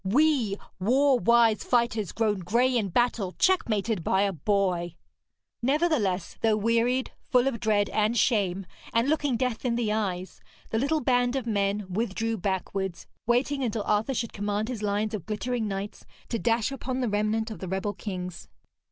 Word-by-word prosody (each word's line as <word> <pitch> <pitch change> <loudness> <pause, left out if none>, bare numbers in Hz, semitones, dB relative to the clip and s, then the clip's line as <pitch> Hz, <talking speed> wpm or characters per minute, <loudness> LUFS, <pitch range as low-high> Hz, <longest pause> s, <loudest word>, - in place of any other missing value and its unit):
We 240 -1 +2 0.2
war 260 +6 +3
wise 235 -2 +4
fighters, 235 -5 +1
grown 215 -3 0
grey 235 +8 +2
in 215 -5 +1
battle, 220 -3 +1
checkmated 220 - +1
by 190 +4 +2
a 200 -1 0
boy!' 175 0 0 0.7
Nevertheless, 250 - +1
though 220 -2 +3
wearied, 230 +4 +1 0.2
full 250 0 +4
of 245 -4 -1
dread 210 -3 +2
and 215 +2 +1
shame, 195 -5 +1 0.3
and 230 +3 +2
looking 290 -4 +1
death 250 -2 -2
in 245 -2 0
the 230 -3 0
eyes, 190 -4 -3 0.3
the 225 - +1
little 300 +5 +1
band 245 -1 +2
of 265 -3 -2
men 200 -2 0
withdrew 225 +3 -2
backwards, 190 -1 -3 0.2
waiting 265 +3 +1
until 225 -3 -1
Arthur 215 +7 0
should 230 -1 -2
command 205 +2 -2
his 240 -4 -4
lines 210 +1 -1
of 210 -3 -5
glittering 225 +1 -2
knights 195 +1 -5 0.3
to 230 - -1
dash 230 +2 +1
upon 260 -1 -3
the 250 - 0
remnant 215 +2 0
of 220 - -7
the 190 - -6
rebel 190 +3 -2
kings. 180 -5 -6
220 Hz, 165 wpm, -27 LUFS, 200-245 Hz, 0.7 s, wise